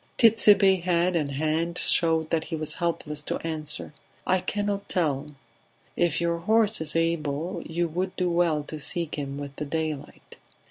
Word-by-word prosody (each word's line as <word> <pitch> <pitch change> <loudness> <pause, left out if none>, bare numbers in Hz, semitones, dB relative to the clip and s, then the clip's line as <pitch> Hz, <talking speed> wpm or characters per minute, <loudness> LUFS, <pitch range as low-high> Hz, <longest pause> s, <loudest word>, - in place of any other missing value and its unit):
Tit'Sebe's 205 -5 +6
head 175 0 +2
and 145 -4 -1
hand 160 +4 -1
showed 160 -1 +2
that 160 -1 0
he 165 - -4
was 155 -1 +1
helpless 150 -3 -1
to - - -3
answer. 155 -2 -3 0.3
"I 185 - +2
cannot 205 +1 -3
tell... 150 -4 -1 0.6
If 170 -2 +1
your 170 0 0
horse 215 +2 +2
is 160 - 0
able 165 +1 -1
you 170 +1 -1
would 180 +3 -3
do 180 - 0
well 170 -3 +1
to 155 +1 -7
seek 170 +2 -2
him 140 -1 -4
with 140 -1 -7
the 150 - -3
daylight." 155 -2 -5
165 Hz, 165 wpm, -26 LUFS, 150-180 Hz, 0.6 s, Tit'Sebe's